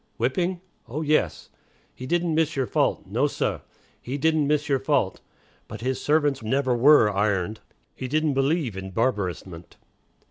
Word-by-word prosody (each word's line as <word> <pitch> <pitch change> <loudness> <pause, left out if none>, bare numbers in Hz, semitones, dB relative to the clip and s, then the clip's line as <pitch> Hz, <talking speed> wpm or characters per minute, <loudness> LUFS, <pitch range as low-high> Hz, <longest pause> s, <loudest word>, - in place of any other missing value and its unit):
Whipping? 175 +9 -1 0.3
Oh, 145 +7 -4
yes. 155 0 0 0.4
"He 130 - -8
didn't 175 +1 0
miss 160 0 +1
your 135 -2 0
fault. 105 - 0
No, 120 +9 +1
sah, - - -2 0.4
he 130 +3 -4
didn't 155 0 +2
miss 150 0 +1
your 140 -3 +2
fault." 135 -7 0 0.5
But 110 - -8
his 130 +1 -2
servants 145 -3 +1
never 130 +3 0
were 125 -3 +6
"ironed." 105 0 0 0.3
He 130 - -6
"didn't 155 +2 +1
believe 135 - 0
in 95 0 -6
barbarousment." 95 -7 -2
135 Hz, 150 wpm, -25 LUFS, 110-150 Hz, 0.5 s, were